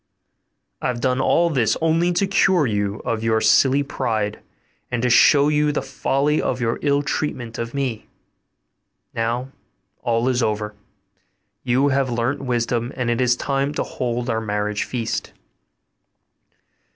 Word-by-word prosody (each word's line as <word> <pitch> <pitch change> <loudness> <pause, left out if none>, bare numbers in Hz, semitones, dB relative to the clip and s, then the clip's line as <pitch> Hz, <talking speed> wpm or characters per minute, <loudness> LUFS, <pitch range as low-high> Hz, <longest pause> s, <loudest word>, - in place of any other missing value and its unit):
I - - -1
have 125 -1 -2
done 130 +1 +1
all 170 +5 +3
this 120 -7 +1
only 165 +2 +2
to 185 +3 +1
cure 190 -4 +3
you 105 -3 -1
of 110 -1 -2
your 110 -1 +2
silly 135 +5 +4
pride, 110 -6 -2 0.5
and 120 - -2
to 125 - +2
show 145 +3 +6
you 150 0 +2
the 145 - -2
folly 140 +3 0
of 125 - -2
your 115 -1 -1
ill 145 0 +1
treatment 125 -6 -3
of 115 +2 -4
me. 130 -6 -3 1.1
Now 120 +3 -2 0.5
all 115 +1 0
is 130 -1 +1
over: 105 -1 -1 0.9
you 130 +3 +2
have 135 -1 +1
learnt 120 +4 -1
wisdom, 120 -1 -1
and 125 -2 -1
it 120 - 0
is 120 -1 +3
time 140 +3 -1
to - - 0
hold 120 -1 -3
our 115 -2 -1
marriage 105 -1 -2
feast. 115 -3 -3
125 Hz, 150 wpm, -21 LUFS, 115-140 Hz, 1.1 s, show